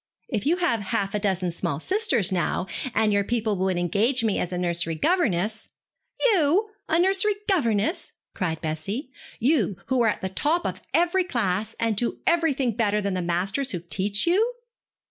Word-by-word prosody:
If 215 +2 -2
you 340 +4 +3
had 350 -11 +1
half 200 -1 -2
a 210 - 0
dozen 190 -3 0
small 145 -3 -2
sisters, 375 - +1
now, 185 0 0 0.3
and 215 -1 +3
your 200 0 +2
people 220 -1 -1
would 185 -1 0
engage 215 - +1
me 215 -3 +1
as 180 - -2
a 180 - -2
nursery 170 -2 0
governess 215 - 0 0.3
' - - -51
'You 405 -2 +3 0.2
a 320 - +3
nursery 385 +3 +3
governess!' 235 - 0 0.2
cried 165 -5 -2
Bessie, 180 - -4 0.3
'you 240 -5 +2
who 260 -2 +2
are 230 - +4
at - - -3
the 190 - -1
top 305 - 0
of - - -3
every 350 +2 +2
class, 220 - -1
and 225 -3 +1
who 240 - -1
do - - -23
everything 310 -7 +2
better 210 -2 +1
than 200 -2 -2
the 185 - -1
masters 190 +10 0
who 175 - -2
teach 190 +5 0
you?' 435 +8 +2
220 Hz, 185 wpm, -25 LUFS, -, 0.3 s, are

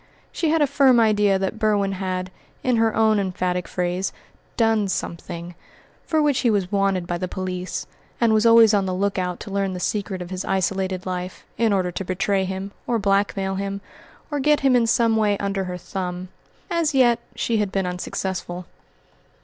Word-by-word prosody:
She 325 - -1
had 320 -1 +3
a - - +5
firm 270 -3 +4
idea 210 -3 +3
that 195 +3 -3
Berwin 205 -3 +2
had, 185 -1 -3 0.3
in 250 -2 +2
her 225 -1 +2
own 220 -1 +3
emphatic 180 -2 -1
phrase, 180 +1 -2 0.5
"done 225 -3 +3
something" 170 -1 -5 0.5
for 315 -2 +2
which 290 -3 +2
he 240 - +2
was 200 -4 0
wanted 195 -3 +1
by 175 0 -3
the 185 - -2
police, 185 -1 -4 0.3
and 230 -2 +3
was 215 0 +3
always 230 -1 +7
on 200 -2 +2
the 185 - -1
look 200 +1 0
out 180 -1 -2
to 200 - -8
learn 195 -1 -1
the 180 - -5
secret 200 0 -2
of 180 0 -7
his 185 0 -3
isolated 190 -1 -1
life, 180 0 -5
in 225 0 +2
order 185 -3 +1
to 195 - -4
betray 195 +1 0
him, 190 +1 -5 0.2
or 240 - +1
blackmail 195 -1 +1
him, 195 +1 -3 0.5
or 290 - -1
get 295 +2 +3
him 270 -2 +4
in 235 -2 +3
some 230 -1 +3
way 210 -2 +2
under 195 -1 -2
her 180 -1 -4
thumb. 180 0 -5 0.4
As 330 -4 +1
yet 240 -3 +4 0.2
she 230 - 0
had 205 -2 0
been 195 -1 0
unsuccessful. 180 0 -4
195 Hz, 190 wpm, -23 LUFS, 185-225 Hz, 0.5 s, always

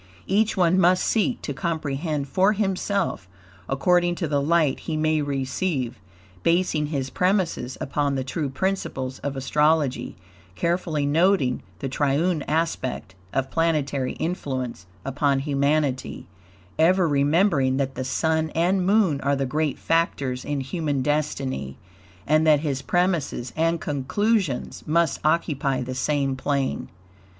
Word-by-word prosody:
Each 215 +2 +1
one 180 0 +4
must 180 0 +4
seek 235 +2 0
to - - -3
comprehend 155 -3 -2
for 190 +8 +3
himself, 195 - -1 0.4
according 175 +5 +2
to 170 - -2
the 145 -1 +1
light 155 -1 +2
he 155 - -1
may 155 0 +2
receive, 135 - -2 0.4
basing 165 - +1
his 135 -3 -3
premises 180 -9 0
upon 140 0 -1
the 135 - -1
TRUE 140 +2 -3
PRINCIPLES 135 -5 -2
of 140 -1 -4
astrology, 150 +1 +1 0.4
carefully 170 - 0
noting 155 -3 +2 0.2
the 135 - -4
triune 145 +5 +1
aspect 150 - -2 0.2
of 135 0 -1
planetary 145 -5 0
influence 130 - -4 0.2
upon 140 +1 +1
humanity, 140 -1 0 0.5
ever 180 +2 +4
remembering 145 -2 +2
that 135 -1 -1
the 130 - -4
Sun 160 +4 0
and 180 +3 +2
Moon 190 -7 +3
are 140 +1 +1
the 135 0 -1
great 150 +3 -1
factors 140 -6 0
in 145 -2 -2
human 145 -1 -2
destiny, 135 - -2 0.5
and 155 +1 +3
that 150 -2 +5
his 140 -4 -2
premises 175 -9 0
and 165 +1 +1
conclusions 155 - -1
must 170 +2 +2
occupy 140 -4 +1
the 130 +1 -5
same 135 0 0
plane. 135 0 -1
150 Hz, 130 wpm, -24 LUFS, 135-170 Hz, 0.5 s, that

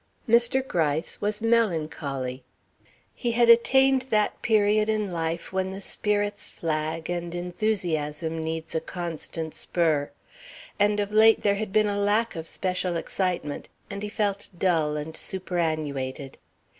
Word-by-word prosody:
Mr. 240 +3 +3
Gryce 160 - -1
was 210 +2 -1
melancholy. 155 - 0 0.7
He 240 -2 -2
had 235 0 +4
attained 265 +3 +5
that 210 -1 +1
period 215 -2 +3
in 215 -3 0
life 165 +2 -3
when 190 0 0
the 190 +1 -6
spirits 205 0 -1
flag 160 0 -3
and 175 -1 -3
enthusiasm 170 -4 -1
needs 160 0 -4
a 160 - 0
constant 165 -2 -5
spur, 155 -5 0 0.7
and 205 +1 +3
of 205 0 -1
late 220 +1 +5
there 200 - +4
had 200 0 -3
been 215 +1 +4
a 205 -1 -1
lack 210 +3 +1
of 165 0 -4
special 180 -1 -1
excitement, 175 -4 -2 0.2
and 200 0 -5
he 210 - -3
felt 205 -2 -2
dull 160 -5 +1
and 155 +2 -5
superannuated. 155 -7 -3
185 Hz, 135 wpm, -26 LUFS, 160-210 Hz, 0.7 s, attained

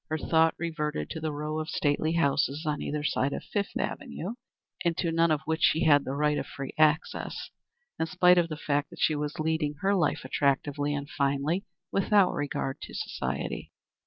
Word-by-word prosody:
Her 155 - 0
thought 160 +1 +3
reverted 160 -3 -3
to 160 - -4
the 155 -1 -2
row 150 +1 -3
of 155 - -4
stately 150 +2 +1
houses 150 -1 +1
on 150 -1 -1
either 150 0 -2
side 140 -2 +1
of - - -4
Fifth 205 -1 -2
Avenue, 190 +7 -4 0.5
into 170 0 0
none 165 +1 +3
of 155 -2 +2
which 160 0 -1
she 160 - +4
had 145 -2 +5
the 135 - -3
right 150 0 +2
of - - -5
free 140 -1 -6
access, 155 +1 +1 0.5
in 160 - +1
spite 180 +1 +5
of 170 -1 +1
the 155 - -4
fact 145 -1 -1
that - - -13
she 155 - +3
was 150 0 -3
leading 155 -1 0
her 195 +1 +3
life 175 -8 +1
attractively 145 +1 0
and 145 0 -4
finely, 140 +7 0 0.3
without 195 -1 +4
regard 140 -2 -3
to - - -8
society. 65 +1 -3
155 Hz, 190 wpm, -28 LUFS, 145-165 Hz, 0.5 s, had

